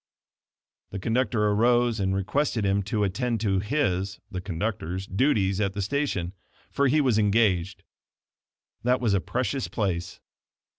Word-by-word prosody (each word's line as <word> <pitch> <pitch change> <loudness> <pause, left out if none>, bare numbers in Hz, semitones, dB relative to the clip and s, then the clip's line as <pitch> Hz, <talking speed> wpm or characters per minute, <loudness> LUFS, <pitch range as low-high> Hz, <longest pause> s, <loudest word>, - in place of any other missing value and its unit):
The 100 - -6
conductor 115 +1 0
arose 120 +1 +3
and 95 -1 0
requested 110 +3 0
him 100 +1 +2
to 105 -2 +1
attend 115 +4 -1
to 95 -3 +1
his 95 -5 -1
(the 90 - -4
conductor's) 95 -1 -3
duty 100 -1 +2
at 100 -1 -1
the 100 - -3
station, 100 -8 -1 0.4
for 140 0 +2
he 150 +4 +3
was 125 -7 +3
engaged. 100 -4 +1 1.0
That 125 +1 +2
was 115 -5 +1
a 100 - +2
precious 130 +3 -2
place. 90 -6 -3
105 Hz, 140 wpm, -26 LUFS, 95-120 Hz, 1.0 s, arose